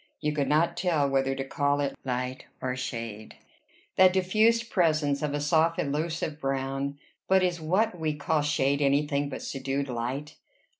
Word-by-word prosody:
You 150 -1 -1
could 145 -2 0
not 155 +3 +2
tell 165 -6 +2
whether 135 0 +1
to 135 - -3
call 145 +1 0
it 140 -1 -1
light 125 0 -3
or 130 -1 -2
shade, 115 -4 -6 0.6
that 185 -1 +7
diffused 220 +5 +2
presence 155 -5 +2
of 150 -1 -1
a - - -1
soft 160 +3 +2
elusive 155 +1 -2
brown; 135 0 -2 0.3
but 190 0 +4
is 175 -2 0
what 180 +3 +1
we 155 -2 -1
call 150 +1 0
shade 140 -1 +1
any 140 +1 +3
thing 145 -1 -1
but - - -6
subdued 135 +1 -3
light? 130 +5 -4
145 Hz, 165 wpm, -27 LUFS, 135-160 Hz, 0.6 s, that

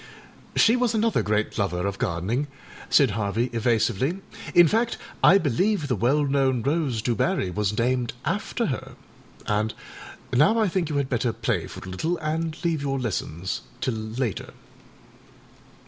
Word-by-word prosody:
â - - -20
âShe 235 +3 +5
was 245 -2 +1
another 220 0 +2
great 105 +1 -1
lover 90 -3 0
of 100 -1 -3
gardening,â 100 +12 -1 0.4
said 140 -6 +5
Harvey, 110 +4 -1
evasively; 120 - +1 0.4
âin 175 -1 +8
fact, 230 +6 +1 0.3
I 195 - +8
believe 170 - +1
the 125 - +1
well 130 +8 +2
known 135 -4 +1
rose 140 -6 0
Du 120 - +1
Barry 95 -3 0
was 105 +2 -1
named 125 0 0
after - - -1
her, - - -8 0.5
and 105 +1 0 0.6
now 150 - +4
I 215 -3 +3
think 175 -3 -1
you 150 - -2
had 140 -2 0
better 120 -2 0
play - - -2
for - - -9
a - - -6
little 160 - -1
and 160 0 -2
leave 165 -3 +1
your 135 -1 -1
lessons 95 -6 -3 0.2
till 130 - -1
later. 110 0 -3
130 Hz, 160 wpm, -25 LUFS, 110-160 Hz, 0.6 s, âin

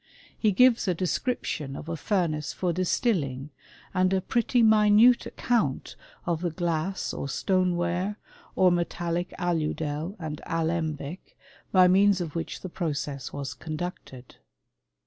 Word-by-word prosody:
He 215 - +2
gives 235 +2 +4
a 180 - +2
description 165 - -2
of 150 - -8
a 165 - -3
furnace 160 -5 -1
for 180 -2 -1
distilling, 155 - 0 0.4
and 185 0 +2
a 190 - +2
pretty 235 +5 +1
minute 220 +2 +5
account 220 - -1 0.3
of 170 -2 -1
the 175 - 0
glass 170 +2 -2
or 140 - -4
stone 185 +3 +1
ware, 175 +4 -1 0.4
or 185 -1 +5
metallic 175 0 -1
aludel 160 -1 -2
and 155 -4 -6
alembic, 165 -1 -3 0.3
by 185 -1 +6
means 195 +1 +4
of 165 -4 -4
which 165 - -4
the - - -5
process 145 -6 -3
was 140 -1 -5
conducted. 155 -5 -7
175 Hz, 130 wpm, -27 LUFS, 155-190 Hz, 0.4 s, by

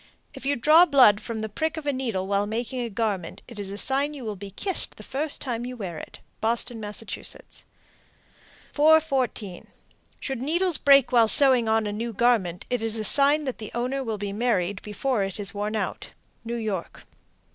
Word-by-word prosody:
If - - -8
you 285 - +1
draw 310 +8 +6
blood 250 -8 +5
from 220 -2 -5
a - - -2
prick 315 +9 -3
of 315 - -5
the 285 -1 -1
needle 230 -8 -3
while 200 +1 0
making 235 +4 -4
a 235 - -3
garment, 200 -5 -3
it 235 -4 -10
is 200 -1 -5
a 200 - -6
sign 275 +6 0
you 265 -4 -8
will 215 -2 -4
be 200 +1 -9
kissed 375 - +1
the - - -11
first 285 +3 -1
time 240 -3 -4
you 250 0 -7
wear 180 -7 -6
it. - - -11 0.2
Boston, 235 +1 -1
Mass. 210 +1 -7 1.7
414. 275 - +1 0.5
Should 265 -3 -4
needles 340 +4 +1
break 275 -2 +5
while 235 -3 +5
sewing 255 -2 +6
on 220 0 +2
a 205 - -3
new 230 +2 -4
garment, 210 -6 +1
it 245 -2 0
is 225 0 -1
a 220 - -3
sign 285 +5 +4
that 260 -3 -5
the 215 - -7
owner 255 +3 -2
will 225 -3 -3
be 200 -1 -5
married 205 -4 -1
before 215 +1 -2
it 195 +2 -5
is 200 -2 -1
worn 210 +1 -3
out. 215 - -4 0.3
_New 235 +1 -4
York. 195 -5 -5
235 Hz, 195 wpm, -25 LUFS, 205-270 Hz, 1.7 s, draw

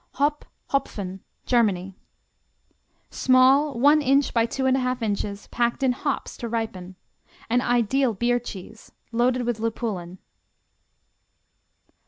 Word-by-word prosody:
Hop, 290 +1 0 0.3
Hopfen 195 -8 -2 0.3
Germany 195 -6 +1 1.2
Small, 265 +2 +4
one 295 +4 +5
inch 275 0 +2
by 230 -1 +2
2 265 +3 -3
1/2 255 -1 +1
inches, 205 -1 -3
packed 240 +2 0
in 260 - +4
hops 275 +3 -3
to 235 - -5
ripen. 190 -5 -4 0.6
An 245 +1 +3
ideal 245 0 +1
beer 245 +4 +1
cheese, 220 -1 -10 0.2
loaded 245 +2 +1
with 240 -2 -2
lupulin. 215 -6 -3
240 Hz, 110 wpm, -24 LUFS, 215-260 Hz, 1.2 s, one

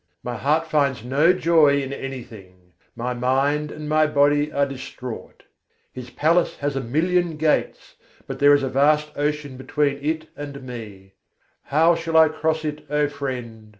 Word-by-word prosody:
My 125 0 -4
heart 155 +5 +1
finds 140 -7 0
no 145 +7 +4
joy 160 -5 +3
in 135 -1 -4
anything: 110 -10 -9 0.2
my 125 +1 -3
mind 135 +5 0
and 150 0 -7
my 155 0 +3
body 145 0 +2
are 140 -1 +1
distraught. 130 -3 -8 0.5
His 125 -1 -8
palace 165 +6 +1
has 145 -1 -2
a 135 - -1
million 165 +6 0
gates, 155 0 -1 0.3
but - - -7
there 145 0 +6
is 140 - 0
a - - 0
vast 150 +3 +2
ocean 145 -2 -2
between 140 +1 -1
it 155 +1 -1
and 140 -2 -8
me: 105 -6 -9 0.5
How 160 +4 +4
shall 165 -1 -1
I 160 -1 +7
cross 155 0 -1
it, 150 0 -4
O 150 0 +1
friend? 125 -6 -6
145 Hz, 160 wpm, -22 LUFS, 130-155 Hz, 0.5 s, I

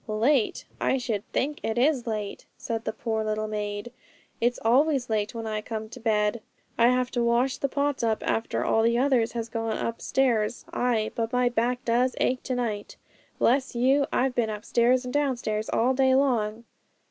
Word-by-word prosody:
'Late? 225 +3 +1
I 265 - +1
should 225 -5 -2
think 295 +3 -1
it 220 +1 -2
is 255 -1 +2
late,' 210 -2 -4
said 225 -1 -4
the - - -1
poor 220 0 -2
little 215 0 -2
maid; 210 +1 -4 0.5
'it's 240 +1 +1
always 260 +1 +3
late 210 +1 -1
when 225 -1 -4
I 215 -1 -2
come 220 -1 -5
to 250 - -10
bed. 215 -1 +1 0.3
I 235 - +5
have 250 0 +2
to 240 - 0
wash 240 +3 +2
the 275 - 0
pots 285 0 -1
up 225 -2 0
after 225 - -1
all 225 - +3
the 235 +1 +3
others 250 -3 +2
has 230 -1 -3
gone 225 -1 -2
upstairs; 230 -1 0
ay! 230 -3 0
but 230 -1 -2
my 250 0 +2
back 245 +1 -1
does 245 +2 +2
ache 255 +1 +1
to 255 - -1
night! 220 -4 -3 0.4
Bless 260 +1 +2
you! 270 +4 +3
I've 260 0 +1
been 235 -3 0
upstairs 235 +4 +1
and 250 - -5
downstairs 240 -7 -1
all 250 +3 +2
day 260 0 +3
long.' 235 -5 +1
235 Hz, 180 wpm, -26 LUFS, 220-255 Hz, 0.5 s, I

